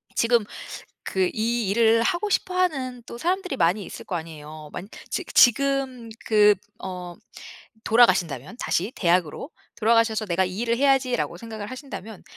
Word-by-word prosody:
지금 235 -1 +3 0.6
그 190 -1 0
이 225 -1 -1
일을 230 +1 +4
하고 365 - 0
싶어 370 -1 0
하는 265 -9 0
또 - - -8
사람들이 365 -1 -1
많이 185 +3 +2
있을 - - -9
거 180 - -3
아니에요. 155 -2 -9
만 195 - -7 0.2
지 - - -2
지금 265 -1 +3 0.2
그 210 -1 +5 0.3
어 180 -2 -6 0.7
돌아가신다면 185 - +3
다시 190 -1 -1
대학으로 175 - 0 0.3
돌아가셔서 225 -1 +2
'내가 185 0 +1
이 185 +1 -5
일을 235 0 +1
해야지.'라고 270 -2 +2
생각을 220 -3 -7
하신다면 250 -6 -8
225 Hz, 320 characters per minute, -24 LUFS, 185-255 Hz, 0.7 s, 그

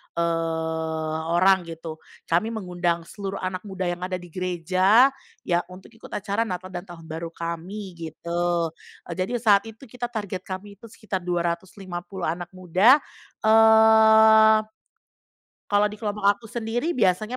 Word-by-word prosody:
eee, 160 -1 -2 0.2
orang 185 -1 +4
gitu. 165 -1 -8 0.2
Kami 175 +6 +1
mengundang 175 -6 -2
seluruh 195 +2 -6
anak 185 0 -2
muda 190 -1 -4
yang 175 0 -2
ada 185 +1 -3
di 175 -2 -9
gereja, 185 - +3 0.3
ya 175 -1 +1
untuk 185 +4 -13
ikut 225 0 -14
acara 205 +3 -2
Natal 185 0 -5
dan 175 +1 -7
Tahun 170 -1 -11
Baru 160 +1 -6
kami 170 +4 -6 0.2
gitu. 170 +1 -2 0.3
E - - -10
jadi 185 +7 -2
saat 220 -3 +3
itu 225 +3 -12
kita 245 -1 -6
target 205 -6 -6
kami 195 +1 -7
itu 230 - -12
sekitar 210 -3 -5
250 175 +1 -4
anak 170 +2 -2
muda, 190 - +4 0.4
eee 220 0 +6 1.1
kalau 205 +1 +4
di 210 - -9
kelompok 210 -2 -4
aku 215 - -22
sendiri 240 +9 -2
biasanya 215 +3 +1
185 Hz, 140 wpm, -24 LUFS, 170-220 Hz, 1.1 s, eee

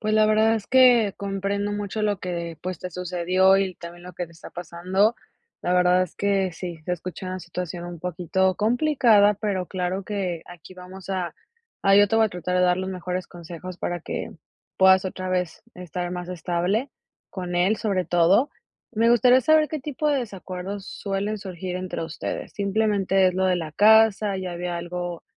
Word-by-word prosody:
Pues 215 -1 -1
la 215 0 +5
verdad 215 +1 +4
es 215 -3 -4
que 245 -5 +5
comprendo 200 +1 -2
mucho 205 +1 -3
lo 205 -2 +1
que, 170 -3 -5
pues, 185 -2 -5
te 180 - -6
sucedió 180 +2 +2
y 190 -2 0
también 175 0 -11
lo 180 - -9
que 175 - -4
te 170 - -18
está 165 - -12
pasando. 180 +6 0 0.5
La 180 - 0
verdad 180 0 +4
es 180 - -5
que 195 -3 0
sí, 175 -2 -6
se 180 - -2
escucha 180 +1 -6
una 185 0 -4
situación 175 0 -6
un 175 -1 -8
poquito 180 +2 0
complicada, 230 -3 +4
pero 195 -3 -2
claro 185 +1 -3
que 185 -5 -3
aquí 175 +1 -13
vamos 185 +1 -11
a 180 -4 -2 0.5
a 195 - +6
Yo 205 0 +6
te 225 - +1
voy 225 - +5
a - - +1
tratar 180 +1 -3
de 180 - +3
dar 180 0 +3
los 190 0 -3
mejores 180 0 -4
consejos 175 +1 -9
para 175 -1 -3
que - - -5 0.5
puedas 190 0 +6
otra 185 0 -4
vez 180 -2 -2
estar 180 0 -5
más 180 0 -5
estable 180 - -1 0.4
con 180 -2 -5
él, 180 +5 +2
sobre 195 -4 -1
todo. 175 - +4 0.4
Me 230 +1 +3
gustaría 245 +2 +5
saber 310 +2 +4
qué 310 -3 -4
tipo 300 +2 -2
de 280 -3 +2
desacuerdos 195 -2 -6
suelen 200 +2 -3
surgir 185 -2 -5
entre 185 -2 -4
ustedes. 160 -1 -5
¿Simplemente 200 -2 +2
es 180 - -3
lo 190 - +1
de 185 -1 +3
la 160 -3 -4
casa, 215 0 +5
ya 185 -2 -4
había 175 0 -3
algo 175 0 -5
185 Hz, 190 wpm, -24 LUFS, 180-205 Hz, 0.5 s, a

